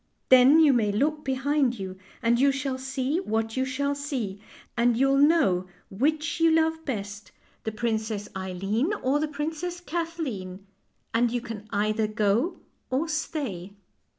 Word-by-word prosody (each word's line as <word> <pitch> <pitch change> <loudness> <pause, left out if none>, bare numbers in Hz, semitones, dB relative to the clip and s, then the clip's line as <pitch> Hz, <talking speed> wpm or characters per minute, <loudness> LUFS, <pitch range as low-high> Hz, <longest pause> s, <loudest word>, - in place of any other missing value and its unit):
Then 260 +4 +8
you 305 -4 +6
may 220 -4 +2
look 300 +8 0
behind 270 -1 +1
you, 190 -2 -6 0.3
and 235 +1 +3
you 275 +1 +5
shall 270 -1 -3
see 265 +4 -1
what 225 - -2
you 260 0 +1
shall 280 +2 -1
see, 260 -9 -4 0.3
and 235 -1 +3
you'll 270 +2 +3
know 280 - +4 0.2
which 305 +11 0
you 330 0 +5
love 320 0 +2
best, 205 -5 -5 0.3
the 220 - -1
Princess 220 -2 -2
138 - - -26
FAIEY 190 +3 -3
TALES - - 0
Eileen - - -10
or 270 +3 +2
the 310 - 0
Princess 320 +4 -4
Kathleen, 300 - -4 0.5
and 235 +1 +3
you 245 +1 -1
can 225 -3 -8
either 215 +1 +1
go 215 - +1 0.3
or 270 +6 0
stay." 270 - -3
260 Hz, 160 wpm, -26 LUFS, 215-300 Hz, 0.5 s, Then